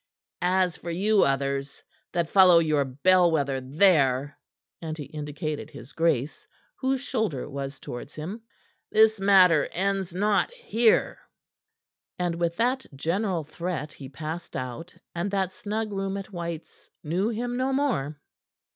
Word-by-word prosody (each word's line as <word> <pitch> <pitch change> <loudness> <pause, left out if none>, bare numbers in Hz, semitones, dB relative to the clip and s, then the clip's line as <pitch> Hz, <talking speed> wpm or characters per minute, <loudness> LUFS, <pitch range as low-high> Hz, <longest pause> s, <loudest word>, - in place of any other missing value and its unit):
"As 180 0 +2
for 170 - -7
you 200 +5 +2
others, 140 0 -1 0.3
that 170 -2 -1
follow 185 -3 +7
your 155 -3 +3
bell 175 +7 +3
wether 140 -4 0
there," 145 -2 +3 0.5
and 160 -1 -5
he 150 - -5
indicated 150 +1 -5
his 120 +4 -12
grace, 155 -4 0 0.3
whose 265 -1 0
shoulder 220 - -2
was 140 0 -6
towards 120 +4 -8
him, 185 +9 -6 0.5
"this 220 -1 +5
matter 185 -5 +5
ends 195 -1 -1
not 205 +1 +2
here." 240 - +2 1.0
And 175 -1 0
with 170 0 -1
that 255 +3 +1
general 175 +4 -1
threat 155 0 -5
he 135 -2 -10
passed 160 +4 -6
out, 130 +8 -6 0.2
and 175 +3 -2
that 190 -2 -1
snug 215 +2 -3
room 195 0 -2
at 195 +1 -7
White's 170 -2 -7
knew 180 +7 0
him 240 +2 -3
no 260 +2 0
more. 230 - -1
170 Hz, 140 wpm, -26 LUFS, 150-200 Hz, 1.0 s, follow